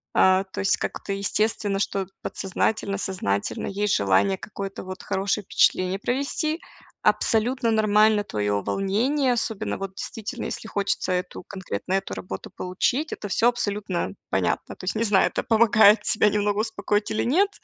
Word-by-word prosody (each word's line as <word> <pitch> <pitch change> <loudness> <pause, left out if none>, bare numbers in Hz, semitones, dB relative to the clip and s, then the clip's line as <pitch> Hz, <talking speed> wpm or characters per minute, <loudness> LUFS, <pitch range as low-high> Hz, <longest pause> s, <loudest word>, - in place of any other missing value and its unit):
А, 190 +1 +5
то 190 - -6
есть 195 - +2
как-то 195 - -4
естественно, 205 0 0
что 195 -1 -1 0.2
подсознательно, 200 +1 -1
сознательно 100 - -2
есть 205 0 0
желание 100 - +3
какое-то 195 -1 -6
вот 185 0 -8
хорошее 200 +1 -1
впечатление 185 +1 +2
провести. 280 +7 -1 0.4
Абсолютно 235 +2 +2
нормально 215 -1 +4
твое 105 - -1
волнение, 245 +8 +1
особенно 220 -3 -2
вот 195 -1 -5
действительно, 225 +4 -5
если 225 - -5
хочется 200 -2 -1
эту 180 0 -3
конкретную 190 - -3
работу 95 0 -6
получить,- 240 - -1
это 205 - -6
всё 230 +5 +3
абсолютно 205 - -2 0.2
понятно. 90 -3 -1
То 185 - -10
есть, 190 - -1
не 225 - +1
знаю, 205 -3 +4
это - - -2
помогает 220 -2 +5
тебя 210 0 +3
немного 205 0 0
успокоить 210 -2 -1
или 215 - 0
нет, 375 +11 +3
200 Hz, 145 wpm, -24 LUFS, 190-220 Hz, 0.4 s, А